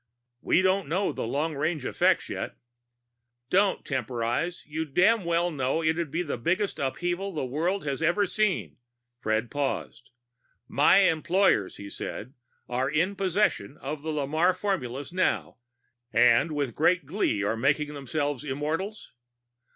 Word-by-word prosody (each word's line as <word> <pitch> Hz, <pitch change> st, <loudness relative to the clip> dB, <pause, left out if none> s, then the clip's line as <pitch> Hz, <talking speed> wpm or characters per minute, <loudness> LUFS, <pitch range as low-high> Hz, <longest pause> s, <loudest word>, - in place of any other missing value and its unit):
"We 185 Hz, -, +3 dB
don't 190 Hz, -1 st, +2 dB
know 190 Hz, +5 st, +1 dB
the -, -, -4 dB
long 150 Hz, +6 st, -1 dB
range 150 Hz, 0 st, -1 dB
effects -, -, +2 dB
yet -, -, -5 dB, 0.5 s
" 120 Hz, 0 st, -55 dB
"Don't 195 Hz, +1 st, +2 dB
temporize. 125 Hz, +5 st, -2 dB
You 155 Hz, +2 st, -3 dB
damned 185 Hz, +7 st, +3 dB
well 170 Hz, +1 st, +1 dB
know 140 Hz, +2 st, -1 dB
it'd 160 Hz, 0 st, 0 dB
be 165 Hz, +5 st, -1 dB
the 145 Hz, -7 st, -4 dB
biggest 185 Hz, -, 0 dB
upheaval 175 Hz, +8 st, -2 dB
the 150 Hz, -4 st, -2 dB
world 165 Hz, +8 st, -1 dB
has 140 Hz, +1 st, -2 dB
ever 175 Hz, +5 st, +3 dB
seen." 210 Hz, -1 st, -1 dB, 0.4 s
Fred 110 Hz, 0 st, -1 dB
paused. 140 Hz, -3 st, -3 dB, 0.6 s
"My 150 Hz, +7 st, +5 dB
employers," 170 Hz, -, +2 dB
he 100 Hz, -, -8 dB
said, 110 Hz, +4 st, -6 dB, 0.3 s
"are 130 Hz, +2 st, -1 dB
in 170 Hz, +7 st, +1 dB
possession 185 Hz, -, 0 dB
of 145 Hz, +2 st, -5 dB
the 160 Hz, -, -5 dB
Lamarre 155 Hz, +5 st, +1 dB
formulas 145 Hz, -8 st, -3 dB
now." 185 Hz, 0 st, 0 dB, 0.5 s
"And 125 Hz, +7 st, +4 dB
with 140 Hz, -5 st, -1 dB
great 170 Hz, +3 st, +2 dB
glee 135 Hz, -, 0 dB
are 100 Hz, -, +1 dB
busy 115 Hz, -, -7 dB
making 150 Hz, +2 st, +1 dB
themselves 145 Hz, 0 st, -2 dB
immortals." 155 Hz, +9 st, -3 dB
155 Hz, 145 wpm, -27 LUFS, 130-180 Hz, 0.6 s, My